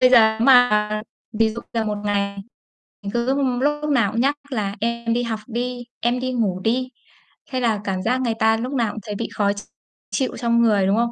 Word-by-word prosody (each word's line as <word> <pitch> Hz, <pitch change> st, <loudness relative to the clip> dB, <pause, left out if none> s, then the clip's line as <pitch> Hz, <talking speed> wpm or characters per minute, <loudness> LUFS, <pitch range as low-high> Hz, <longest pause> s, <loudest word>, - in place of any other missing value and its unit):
Bây 255 Hz, 0 st, +6 dB
giờ 220 Hz, -3 st, +6 dB
nếu 230 Hz, -, +1 dB
mà 215 Hz, -5 st, +5 dB, 0.3 s
ví 220 Hz, 0 st, +2 dB
dụ 230 Hz, +2 st, -6 dB
là 230 Hz, -1 st, 0 dB
một 210 Hz, -1 st, -2 dB
ngày 200 Hz, -1 st, -1 dB, 0.7 s
mình 200 Hz, -, -4 dB
cứ 240 Hz, +3 st, +1 dB, 0.3 s
lúc 295 Hz, +1 st, 0 dB
nào 235 Hz, -8 st, +3 dB
cũng 230 Hz, -, 0 dB
nhắc 280 Hz, +3 st, +2 dB
là 210 Hz, -6 st, -2 dB
em 235 Hz, 0 st, -1 dB
đi 240 Hz, +1 st, 0 dB
học 225 Hz, -2 st, -3 dB
đi, 245 Hz, +1 st, -3 dB
em 240 Hz, +1 st, +1 dB
đi 255 Hz, 0 st, -2 dB
ngủ 205 Hz, -7 st, 0 dB
đi, 250 Hz, +6 st, 0 dB, 0.6 s
hay 255 Hz, -1 st, -1 dB
là 225 Hz, -4 st, +1 dB
cảm 190 Hz, -2 st, -2 dB
giác 250 Hz, +5 st, +1 dB
người 235 Hz, -3 st, 0 dB
ta 220 Hz, 0 st, +4 dB
lúc 250 Hz, +4 st, -4 dB
nào 235 Hz, -5 st, +1 dB
cũng 215 Hz, -, -7 dB
thấy 210 Hz, 0 st, -5 dB
bị 230 Hz, +2 st, -3 dB
khó 200 Hz, -1 st, +2 dB
ch 205 Hz, -, -7 dB, 0.5 s
chịu 255 Hz, +6 st, -1 dB
trong 235 Hz, -1 st, +2 dB
người, 210 Hz, -4 st, +3 dB
đúng 195 Hz, -, +3 dB
không? 235 Hz, 0 st, +1 dB
230 Hz, 225 wpm, -22 LUFS, 210-245 Hz, 0.7 s, Bây